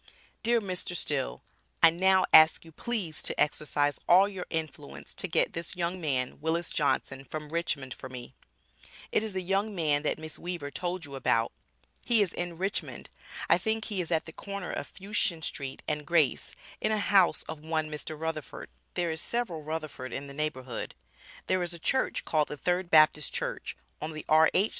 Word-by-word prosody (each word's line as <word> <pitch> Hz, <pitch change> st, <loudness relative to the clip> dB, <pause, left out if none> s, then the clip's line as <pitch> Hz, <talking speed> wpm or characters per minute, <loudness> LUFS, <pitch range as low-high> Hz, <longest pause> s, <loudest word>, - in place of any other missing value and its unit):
Dear 235 Hz, +1 st, +3 dB
Mr. 180 Hz, -2 st, -1 dB
Still 60 Hz, -, -1 dB, 0.4 s
I 165 Hz, -, +10 dB
now 190 Hz, +2 st, +4 dB
ask 155 Hz, +1 st, +8 dB
you 165 Hz, -, -12 dB
please 170 Hz, -6 st, -2 dB
to -, -, -1 dB
exercise 150 Hz, -1 st, +1 dB
all 185 Hz, +3 st, +8 dB
your 190 Hz, -3 st, -6 dB
influence 155 Hz, -, -5 dB
to -, -, -4 dB
get -, -, +2 dB
this 165 Hz, +2 st, -4 dB
young 175 Hz, +1 st, -2 dB
man 130 Hz, -5 st, -1 dB
Willis 165 Hz, +2 st, -1 dB
Johnson 135 Hz, -2 st, 0 dB
from 150 Hz, +2 st, -6 dB
Richmond 155 Hz, -6 st, -2 dB
for 130 Hz, -, -9 dB
me 125 Hz, 0 st, -8 dB, 0.8 s
It -, -, +3 dB
is 220 Hz, -2 st, -3 dB
the 185 Hz, -1 st, -2 dB
young 195 Hz, +3 st, 0 dB
man 150 Hz, -4 st, +2 dB
that 150 Hz, -, 0 dB
Miss 155 Hz, 0 st, -7 dB
Weaver 175 Hz, -5 st, -4 dB
told 175 Hz, 0 st, -3 dB
you 140 Hz, -, -10 dB
about, 115 Hz, -4 st, +1 dB, 0.5 s
he 230 Hz, -3 st, +5 dB
is 185 Hz, -, -4 dB
in 175 Hz, -1 st, -4 dB
Richmond 195 Hz, +3 st, -3 dB, 0.4 s
I -, -, +5 dB
think 220 Hz, -1 st, -1 dB
he 200 Hz, -4 st, -1 dB
is 170 Hz, -, -4 dB
at 160 Hz, -1 st, +2 dB
the 160 Hz, -, -10 dB
corner 200 Hz, -1 st, -5 dB
of -, -, -5 dB
Fushien 195 Hz, -4 st, -1 dB
Street, 135 Hz, -3 st, -4 dB
& 150 Hz, -, -10 dB
Grace 155 Hz, -3 st, +2 dB, 0.3 s
in -, -, +1 dB
a 215 Hz, -, +2 dB
house 200 Hz, -3 st, +4 dB
of 155 Hz, -1 st, -8 dB
one 160 Hz, -1 st, -1 dB
Mr. 150 Hz, 0 st, -5 dB
Rutherford, 160 Hz, -3 st, -4 dB, 0.3 s
there 175 Hz, -2 st, 0 dB
is 160 Hz, 0 st, -3 dB
several 220 Hz, -10 st, -2 dB
Rutherford 155 Hz, -4 st, -5 dB
in 140 Hz, -, -4 dB
the 140 Hz, -, -9 dB
neighborhood, 130 Hz, -5 st, -3 dB, 0.5 s
there 185 Hz, 0 st, +1 dB
is 175 Hz, -1 st, 0 dB
a -, -, -10 dB
church 260 Hz, +10 st, 0 dB
call'd 155 Hz, -2 st, +2 dB
the 150 Hz, -, -6 dB
third 180 Hz, +4 st, 0 dB
Baptist 155 Hz, -2 st, +5 dB
Church, -, -, -3 dB, 0.2 s
on 155 Hz, +1 st, -4 dB
the 155 Hz, -, -7 dB
R.H. 160 Hz, +7 st, +5 dB
160 Hz, 185 wpm, -29 LUFS, 150-185 Hz, 0.8 s, I